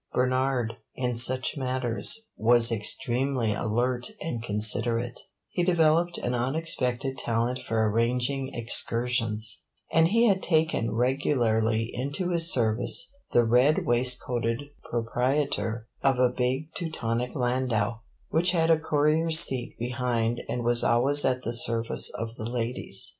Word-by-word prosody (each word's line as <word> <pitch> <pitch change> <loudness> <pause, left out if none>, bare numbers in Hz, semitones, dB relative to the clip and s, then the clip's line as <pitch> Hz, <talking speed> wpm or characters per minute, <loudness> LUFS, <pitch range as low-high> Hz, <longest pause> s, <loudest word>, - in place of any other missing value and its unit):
Bernard, 130 -2 0 0.2
in 125 -2 -2
such 130 +1 +1
matters, 130 - 0
was 120 +1 +4
extremely 120 +2 0
alert 120 +3 -1
and 120 -8 -4
considerate; 115 +2 -1 0.3
he 175 - -2
developed 170 -1 +2
an 120 - -3
unexpected 130 -1 -1
talent 120 +2 -1
for 110 -1 -1
arranging 125 +5 0
excursions, 115 -2 0 0.3
and 165 +1 +5
he 230 +6 +3
had 195 -4 +2
taken 160 -8 0
regularly 115 -3 0
into 140 +8 -3
his 170 -1 +3
service 120 - +1 0.2
the 120 - +4
red 125 +6 +3
waistcoated 120 0 +1 0.3
proprietor 120 -1 -1
of 135 -2 +2
a 125 -1 +2
big 130 +6 -2
Teutonic 125 -7 -3
landau, 120 -4 -1 0.3
which 175 +3 +1
had 165 -1 +2
a 160 - +4
courier's 155 +1 +2
seat 130 -7 +1
behind 120 -1 -2
and 120 - -3
was 120 0 +3
always 135 +5 +4
at 125 -1 0
the 115 - -3
service 115 -1 +1
of 115 0 -5
the 110 - -6
ladies. 120 0 -3
125 Hz, 125 wpm, -26 LUFS, 115-140 Hz, 0.3 s, and